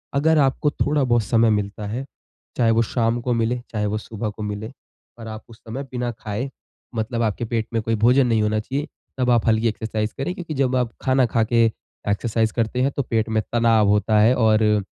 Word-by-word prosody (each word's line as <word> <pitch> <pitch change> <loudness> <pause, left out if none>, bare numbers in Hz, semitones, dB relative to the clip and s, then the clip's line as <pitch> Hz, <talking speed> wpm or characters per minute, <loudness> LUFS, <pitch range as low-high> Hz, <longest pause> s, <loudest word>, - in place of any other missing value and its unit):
अगर 160 +3 +3
आपको 140 +1 +2
थोड़ा 145 -1 0
बहुत 120 -3 +2
समय 115 +1 +3
मिलता 105 0 -1
है, 125 +6 -4 0.5
चाहे 115 -2 +3
वो 115 +1 +3
शाम 115 +1 0
को 125 +1 0
मिले, 115 +1 0
चाहे 105 -2 -1
वो 105 +1 -1
सुबह 110 0 -5
को 105 +1 -7
मिले 105 +2 -5 0.5
और 115 - -8
आप 110 0 -7
उस 115 - -14
समय 120 +4 -6
बिना 125 -1 -2
खाए 110 +5 -4 0.5
मतलब 115 +1 -2
आपके 110 +1 -1
पेट 115 -1 -2
में 115 - +1
कोई 115 +1 0
भोजन 125 +1 +5
नहीं 115 -2 +2
होना 105 0 +1
चाहिए, 140 +7 -3 0.3
तब 125 -1 +2
आप 120 -1 +2
हल्की 110 +1 +3
एक्सरसाइज़ 110 -1 -2
करें। 135 +7 -2
क्योंकि 170 -3 -6
जब 135 -2 +1
आप 125 -2 0
खाना 130 -1 +3
खा 115 -1 +1
के 115 +1 +3 0.4
एक्सरसाइज़ 110 +1 0
करते 115 +2 -1
हैं 135 +2 +2
तो 140 - 0
पेट 115 -3 -1
में 110 0 +1
तनाव 115 -3 +4
होता 105 +1 +3
है 110 +4 +5
और 110 -3 +3
115 Hz, 210 wpm, -22 LUFS, 110-125 Hz, 0.5 s, भोजन